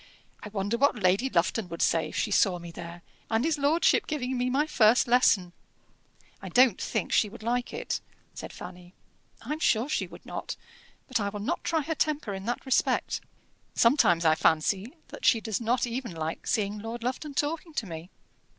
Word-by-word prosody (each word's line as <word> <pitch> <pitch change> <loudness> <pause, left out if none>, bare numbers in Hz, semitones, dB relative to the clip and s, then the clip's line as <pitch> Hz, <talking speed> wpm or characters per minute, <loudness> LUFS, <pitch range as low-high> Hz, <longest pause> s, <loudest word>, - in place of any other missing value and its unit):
I 210 - -7
wonder 205 +3 -2
what 280 -1 +4
Lady 200 +5 +2
Lufton 180 +1 0
would 170 - -2
say 165 -1 +2
if - - -10
she 210 - 0
saw 190 -2 +3
me 170 -1 -9
there, 170 0 -9 0.3
and 225 +4 +1
his 320 -2 0
lordship 295 +4 +3
giving 260 -4 -2
me 250 0 0
my 275 +4 +2
first 240 -5 +4
lesson?" 220 -7 +3 0.9
"I - - -7
don't 250 -1 +4
think - - -2
she 210 - +3
would 220 +1 -12
like 245 +2 -1
it," - - -3 0.3
said - - -8
Fanny. 180 0 -11 0.5
"I'm 305 +1 -3
sure 235 -4 +2
she 305 - -1
would - - -14
not. - - -5 0.5
But 255 -3 0
I 200 -1 -1
will 205 0 -6
not 205 - -2
try 325 -1 +1
her 315 +3 -2
temper 300 -8 -1
in 190 0 -6
that 240 +4 -3
respect. 265 - +1 0.5
Sometimes 215 - +4
I 160 - +6
fancy 190 +8 +1 0.2
that - - -10
she 230 - +5
does 220 0 -3
not 240 +3 +1
even 240 -3 -4
like 160 0 -4
seeing 210 -1 0
Lord 230 +2 -6
Lufton 265 +4 -3
talking 315 +2 -2
to 225 - -1
me." 165 -1 -8
225 Hz, 190 wpm, -28 LUFS, 190-260 Hz, 0.9 s, I